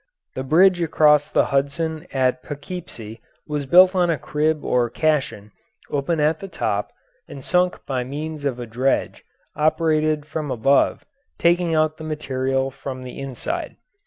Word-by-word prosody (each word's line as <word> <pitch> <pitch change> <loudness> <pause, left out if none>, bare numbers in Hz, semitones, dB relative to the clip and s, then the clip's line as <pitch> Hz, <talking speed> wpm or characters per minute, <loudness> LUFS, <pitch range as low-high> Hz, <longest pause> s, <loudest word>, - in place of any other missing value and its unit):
The 130 - -4
bridge 175 +6 +4
across 150 -2 +4
the - - +2
Hudson 155 +4 -1
at 130 -1 +1
Poughkeepsie 140 - -8 0.2
was 150 -2 -3
built 180 +4 +7
on 180 -2 +2
a 165 - +1
crib 150 +1 -1
or 120 -1 +1
caisson 135 -10 -1 0.4
open 145 +3 -1
at 150 +1 +2
the 195 - -7
top - - -2 0.4
and 135 - -10
sunk 180 0 0
by 130 -2 -2
means 150 +3 -6
of 135 -3 -2
a 120 - -5
dredge 125 +4 -1 0.3
operated 155 -1 +1
from 155 -1 -4
above 135 +3 +2 0.3
taking 170 -1 +2
out 155 0 +1
the 160 - -9
material 135 -3 -2
from 130 -1 -7
the 125 +1 -8
inside. 135 -2 -5
150 Hz, 150 wpm, -22 LUFS, 135-160 Hz, 0.4 s, built